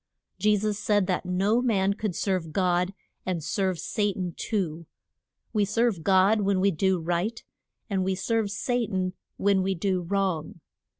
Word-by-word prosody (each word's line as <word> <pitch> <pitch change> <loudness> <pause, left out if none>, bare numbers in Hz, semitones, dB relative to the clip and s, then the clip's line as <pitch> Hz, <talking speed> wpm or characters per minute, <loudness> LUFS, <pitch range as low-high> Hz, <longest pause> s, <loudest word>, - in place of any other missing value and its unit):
Je 210 0 +4
sus 210 0 -1
said 205 -1 +2
that 185 -1 -1
no 195 +6 +2
man 200 -5 +2
could 205 -3 -3
serve 185 -5 -1
God 180 +1 +1 0.3
and 180 -4 -2
serve 190 +2 0
Sa 205 +5 0
tan 180 -2 -4
too. 170 -7 -2 0.7
We 210 -2 +3
serve 210 -3 +1
God 195 +3 +4
when 195 -1 +2
we 195 +1 +3
do 190 +2 +1
right; 175 +7 -2 0.4
and 195 -3 0
we 190 0 0
serve 220 +2 0
Sa 245 +4 0
tan 185 -2 -1 0.2
when 200 -1 +3
we 190 0 0
do 185 +1 0
wrong. 175 -3 -1
195 Hz, 165 wpm, -27 LUFS, 180-205 Hz, 0.7 s, Je